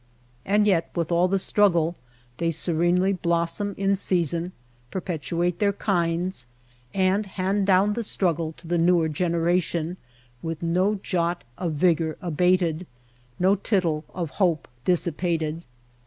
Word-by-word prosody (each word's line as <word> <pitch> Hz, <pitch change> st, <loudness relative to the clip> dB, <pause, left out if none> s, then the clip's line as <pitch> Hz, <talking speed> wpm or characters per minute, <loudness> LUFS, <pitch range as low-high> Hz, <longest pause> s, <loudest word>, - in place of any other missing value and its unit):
And 205 Hz, +2 st, +3 dB
yet 180 Hz, -5 st, +2 dB
with 170 Hz, -1 st, -1 dB
all 170 Hz, +2 st, +3 dB
the 195 Hz, +1 st, +1 dB
struggle 175 Hz, -4 st, +2 dB, 0.4 s
they 170 Hz, -, 0 dB
se 165 Hz, +2 st, -2 dB
renely 175 Hz, +4 st, +2 dB
blossom 170 Hz, +4 st, 0 dB
in 195 Hz, 0 st, +2 dB
season, 175 Hz, -2 st, 0 dB, 0.4 s
perpetuate 175 Hz, 0 st, -2 dB
their 200 Hz, -1 st, +2 dB
kinds, 175 Hz, -, -1 dB, 0.4 s
and 195 Hz, +2 st, +1 dB
hand 195 Hz, +1 st, -1 dB
down 195 Hz, +2 st, +4 dB
the 235 Hz, -, -2 dB
struggle 170 Hz, -7 st, 0 dB
to 170 Hz, -, -16 dB
the 170 Hz, +1 st, 0 dB
newer 170 Hz, -1 st, +3 dB
gen 165 Hz, +3 st, -1 dB
eration 170 Hz, 0 st, 0 dB, 0.4 s
with 165 Hz, 0 st, -5 dB
no 185 Hz, +5 st, +2 dB
jot 175 Hz, -1 st, -1 dB
of 170 Hz, +1 st, -3 dB
vigor 160 Hz, 0 st, +1 dB
abated, 180 Hz, 0 st, +1 dB, 0.5 s
no 185 Hz, +2 st, +4 dB
tittle 180 Hz, -7 st, 0 dB
of 170 Hz, -5 st, -4 dB
hope 170 Hz, -5 st, +2 dB, 0.2 s
dissipated. 170 Hz, -2 st, 0 dB
175 Hz, 135 wpm, -25 LUFS, 165-185 Hz, 0.5 s, down